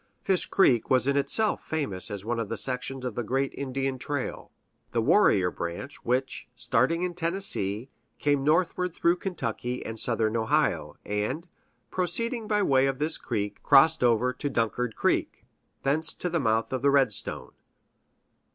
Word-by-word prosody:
Fish 190 -2 +1
Creek 125 - +3
was 130 0 +3
in 140 - +2
itself 140 +10 +3
famous 140 -13 -2
as 100 -1 -6
one 120 +1 -1
of 115 -3 -3
the 115 - -2
sections 130 +3 -2
of 125 - -3
the 120 - -2
great 135 +4 -1
Indian 135 -1 -3
trail, 145 0 -4 0.4
"The 115 - +2
Warrior 100 - +4
Branch," 85 - -5
which, 130 +2 -1
starting 165 +9 +1
in 180 -1 -2
Tennessee, 165 - 0 0.3
came 145 -2 +1
northward 175 +3 +1
through 170 +1 +2
Kentucky 125 - -4
and 115 0 -5
Southern 115 -1 +1
Ohio, 110 -1 0
and, 105 - -2 0.4
proceeding 225 +6 -1
by 210 -1 +1
way 135 -4 +3
of 135 -1 -1
this 155 +3 -2
creek, 105 -4 -3
crossed 150 +2 +5
over 120 +1 +3
to 145 +3 -4
Dunkard 115 -1 -1
Creek, - - -1 0.4
thence 155 +4 +1
to 180 - -3
the 170 - +1
mouth 115 -1 0
of 130 0 -2
Redstone. 135 - +1
135 Hz, 155 wpm, -27 LUFS, 115-160 Hz, 0.4 s, crossed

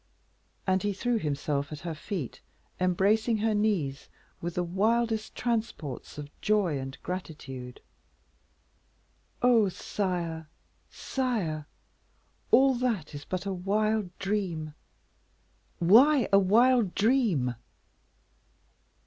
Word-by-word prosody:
And 190 0 +2
he 205 -1 0
threw 235 +4 0
himself 145 -2 -2
at 150 0 -7
her 170 -1 -4
feet, 155 - -5 0.4
embracing 205 +5 +2
her 220 +1 +1
knees 195 -11 0 0.3
with 170 0 -4
the 180 - +1
wildest 220 +5 0
transports 220 - -3
of 145 -1 -7
joy 200 -9 +2
and 135 0 -6
gratitude. 140 -8 -6 1.6
"Oh! 230 -5 +5
sire, 170 -5 -3 0.4
sire! 200 - -2 0.8
all 270 0 +6
that 240 -12 -1
is 145 0 -8
but 185 +1 -4
a 195 - -1
wild 205 +1 0
dream." 190 -7 -2 1.0
"Why, 245 - +6
a 195 - +8
wild 225 +1 +4
dream?" 205 - +2
190 Hz, 100 wpm, -28 LUFS, 160-220 Hz, 1.6 s, a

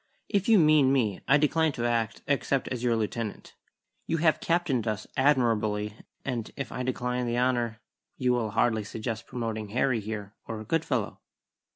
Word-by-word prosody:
"If 200 +1 +1
you 225 - +7
mean 150 -5 +5
me, 115 -8 +1
I 140 - +6
decline 155 +1 +2
to 120 - -2
act 115 -2 -1
except 140 -1 +1
as 125 -2 -3
your 120 -2 +3
lieutenant. 110 0 -3 0.5
You 165 - +1
have 160 -1 +3
captained 165 -9 0
us 105 -1 -2
admirably; 110 -7 +2 0.3
and 120 -5 -3
if 135 -4 -5
I - - -4
decline 125 -1 -1
the 120 0 -1
honour, 120 -3 +1 0.4
you 125 -1 +2
will 115 -3 0
hardly 110 +1 +1
suggest 110 +1 -5
promoting 110 -3 -4
Harry, 125 +2 +1
here, 105 -1 -6
or 110 -1 -5
Goodfellow!" 135 -4 -1
120 Hz, 165 wpm, -28 LUFS, 110-140 Hz, 0.5 s, you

